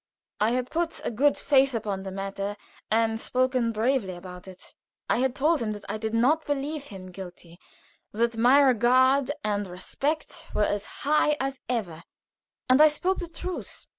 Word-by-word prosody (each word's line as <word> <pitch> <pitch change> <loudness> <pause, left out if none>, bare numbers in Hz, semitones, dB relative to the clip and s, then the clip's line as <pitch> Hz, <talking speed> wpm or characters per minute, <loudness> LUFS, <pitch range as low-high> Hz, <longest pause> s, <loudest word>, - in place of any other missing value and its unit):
I 215 - +3
had 250 0 -2
put 335 0 -1
a - - -1
good 280 +6 +2
face 270 -2 +3
upon 205 -3 -3
the 190 0 -6
matter 195 +1 -4 0.3
and 225 0 +1
spoken 255 -2 +1
bravely 225 -3 0
about 180 +1 -10
it. 185 -1 -13 0.3
I - - +1
had 260 0 +1
told 300 +1 +2
him 215 -2 -1
that 205 -1 -10
I 210 +2 -4
did 220 +1 -2
not 290 +8 +2
believe 290 +1 -2
him 185 -6 -10
guilty 175 -2 -11 0.5
that 230 +2 0
my 245 +5 +5
regard 260 +1 +4
and 205 -1 -1
respect 300 - -4
were 210 - +3
as 205 0 -2 0.2
high 300 0 +3
as 270 0 -3
ever, 190 -10 -2 0.7
and 255 +3 +5
I 310 - +9
spoke 360 +6 0
the 350 - -4
truth. 360 +2 -7
240 Hz, 170 wpm, -26 LUFS, 205-280 Hz, 0.7 s, I